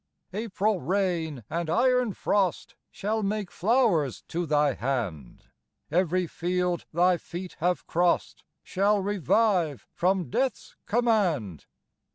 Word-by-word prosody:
"April 210 -2 -1
rain 165 - -1
and 170 -1 -3
iron 250 +4 +2
frost 195 -3 0 0.2
Shall 220 +2 -2
make 205 -2 -2
flowers 190 - +1
to 170 0 -2
thy 150 -2 +3
hand; 110 - -3 0.5
Every 180 +1 +2
field 180 +1 -1
thy 175 +2 +3
feet 175 +2 -8
have 180 +2 0
crossed 175 +1 0 0.2
Shall 200 +2 +2
revive 190 - +1
from 180 -6 0
death's 265 -3 -1
command. 195 - +1
180 Hz, 110 wpm, -27 LUFS, 160-205 Hz, 0.5 s, thy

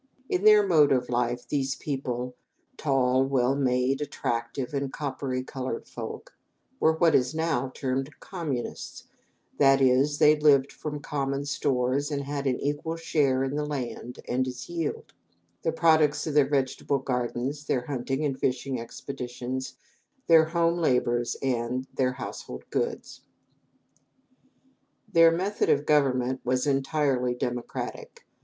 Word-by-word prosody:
In 180 +3 0
their 210 -1 +7
mode 155 -6 +5
of 125 -2 +1
life 120 0 -1
these 135 -2 -1
people 125 -3 -4 0.4
tall, 130 -3 +2
well 135 -1 +1
made, 130 0 +1
attractive, 120 -2 -3
and 140 -1 -2
coppery 135 -3 -3
colored 130 -2 -5
folk - - -8 0.4
were 160 - +4
what 160 0 +3
is 125 +3 +2
now 155 -6 0
termed 135 0 -2
communists, 155 -10 -5 0.6
that 135 -1 +6
is, 135 +2 +3
they 150 +1 +6
lived 145 -3 +4
from 150 -1 -6
common 140 -1 -2
stores 140 0 0
and 140 -2 -2
had 140 0 -3
all 130 - +3
an - - -5
equal 145 +3 -2
share 145 -5 +1
in 135 +1 -2
the 150 - -1
land 125 -4 -5
and 130 +1 0
its 125 -1 -6
yield 165 -3 -4 0.5
the 165 - 0
products 155 -2 +3
of 155 - -3
their 145 -2 +4
vegetable 140 0 0
gardens, 130 +2 -3
their 125 -3 -1
hunting 135 +2 -2
and 135 -2 -2
fishing 130 -1 -1
expeditions, 125 +1 -6 0.5
their 160 -1 +6
home 170 +1 +1
labors, 120 -5 +1
and 125 0 -1
their 125 -1 +1
household 130 - -7
goods. 470 -2 -3 1.9
Their 165 -1 +8
method 190 +5 0
of 145 +1 +3
government 130 -3 +2
was 125 +2 0
entirely 135 -3 +1
democratic. 125 -1 -5
135 Hz, 135 wpm, -27 LUFS, 125-150 Hz, 1.9 s, Their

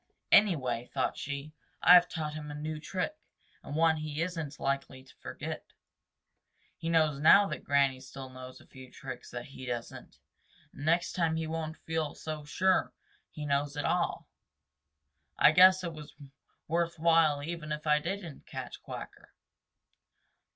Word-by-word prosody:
"Anyway," 130 - +3
thought 130 - -1
she, 145 +2 -6 0.3
"I - - +9
have 175 -1 +7
taught 155 -3 -4
him 150 -1 -7
a 145 - -6
new 155 +1 -4
trick 185 - -3 0.5
and 145 - -7
one 160 0 +4
he 155 -1 -5
is 180 +1 -4
n't 150 -3 -5
likely 135 -1 -2
to 130 - -19
forget. - - -6 1.1
He 165 0 -5
knows 155 -4 +2
now 200 +7 +7
that - - -5
Granny 140 -2 +2
still 130 0 -9
knows 130 0 -10
a - - -18
few 130 -1 -13
tricks 130 -1 -9
that 120 0 -6
he 130 -1 -10
doesn't, 120 -1 -6 0.6
and 145 - -8
next 170 +2 +2
time 165 -3 +1
he 160 0 -2
won't 160 0 -4
feel 160 -2 -3
so 155 -1 -6
sure 185 +6 +1 0.4
he 150 - -7
knows 145 0 0
it 145 - -2
all. - - 0 1.1
I - - +7
guess 185 +1 +7
it 170 -2 -4
was 150 -2 -11 0.5
worth 170 +1 0
while 160 -3 +3
even 160 -1 -5
if 150 +1 -4
I 150 0 +4
didn't 170 -1 -6
catch - - -7
Quacker. - - -9
155 Hz, 160 wpm, -30 LUFS, 140-165 Hz, 1.1 s, I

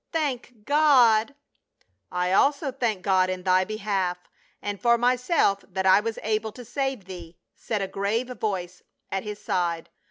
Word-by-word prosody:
"Thank 250 -8 -3
God 275 -5 +4 0.2
!" - - -42
" - - -52
I 180 0 -1
also 280 - +2
thank 230 -7 -2
God 185 -2 +3
in 185 -1 -4
thy 185 0 +3
behalf, 195 -4 -2 0.4
and 205 -1 -5
for 235 -1 +4
myself 245 - +2
that 190 0 -3
I 190 +1 +6
was 225 +1 -4
able 220 0 -1
to 245 +1 -11
save 265 -3 -3
thee," 175 -3 -10 0.2
said 210 -3 -3
a - - -2
grave 205 +6 -2
voice 180 -4 -3 0.3
at 195 0 -2
his 210 -1 -6
side. 175 -5 -2
210 Hz, 165 wpm, -25 LUFS, 185-245 Hz, 0.4 s, I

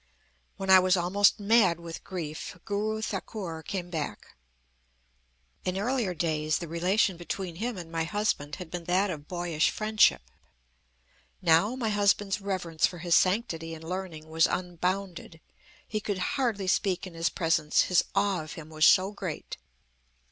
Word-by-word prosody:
"When 195 -1 0
I 190 - +10
was 185 0 +3
almost 195 +4 +3
mad 200 -5 +4
with 170 -1 -8
grief, 165 -2 -6
Guru 215 +1 -2
Thakur 190 -5 -4
came 175 +2 -5
back. 155 -4 -5 1.3
In 185 +1 -2
earlier 220 -3 0
days, 155 -2 0
the 170 - -6
relation 180 +3 +1
between 175 0 -5
him 230 +2 -3
and 170 -2 -8
my 165 -1 -1
husband 170 -6 -1
had 180 -3 -9
been 175 -1 -5
that 185 +3 +2
of 150 -3 -7
boyish 175 -3 0
friendship. 215 - +3 1.2
Now, 180 +7 +3
my 240 -4 -1
husband's 205 -1 +2
reverence 180 -5 0
for 180 - -9
his 170 0 +2
sanctity 165 -5 +1
and 160 - -11
learning 170 -2 -5
was 160 +1 +3
unbounded. 180 -1 -3 0.5
He 215 - -2
could 205 -2 -2 0.2
hardly 235 -8 0
speak 185 0 +1
in 185 - -9
his 165 +1 0
presence, 160 -3 +2
his 180 - +3
awe 195 -3 +2
of 155 -1 -8
him 160 -1 -10
was 155 0 +4
so 190 +2 +5
great. 185 -6 -6
180 Hz, 155 wpm, -28 LUFS, 165-200 Hz, 1.3 s, I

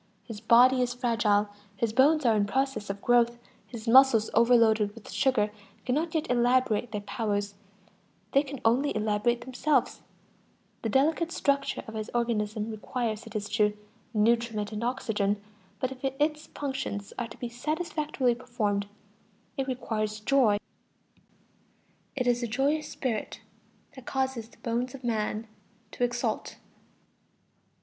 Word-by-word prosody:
His 220 -3 -9
body 250 +3 +6
is 245 -1 -1
fragile, 220 -4 +2 0.3
his 225 +1 0
bones 285 +4 +4
are 230 -2 +5
in 205 -1 +2
process 265 -3 -1
of 200 0 -5
growth, 240 -1 +3 0.3
his 230 -2 -9
muscles, 240 -2 +6
overloaded 225 -3 +4
with 230 - -11
sugar, 255 -6 +2 0.3
cannot 315 +6 -1
yet 315 - 0
elaborate 245 -2 +2
their 210 -1 -3
powers; 205 -1 -2 0.8
they 275 - +5
can 280 -2 -7
only 255 +6 +2
elaborate 215 +3 +1
themselves; 260 +5 0 0.8
the 225 - -2
delicate 315 +7 +2
structure 280 -4 0
of 220 - -8
his 215 -1 -4
organism 220 -2 -1
requires, 220 0 -3
it 220 - -12
is 205 -1 -2
true, 210 -1 +1 0.3
nutriment 225 -1 +1
and 215 +1 -4
oxygen; 210 -4 0 0.4
but 255 - -1
if 260 0 -10
its 300 +3 -1
functions 265 -8 -4
are 240 - -2
to 225 - -12
be 245 - -4
satisfactorily 300 0 -1
performed, 220 -5 -2 0.7
it 270 -2 -2
requires 215 -4 -2
joy. 225 -2 +3 1.6
It 255 -3 -1
is 245 0 +2
a 240 - -1
joyous 285 +6 0
spirit 235 -5 -3 0.5
which 260 - -11
causes 265 -4 -2
"the - - -21
bones 245 +2 -2
of 265 - -12
man 220 -1 -1 0.5
to - - -3
exult." 240 -2 -2
235 Hz, 140 wpm, -28 LUFS, 215-265 Hz, 1.6 s, body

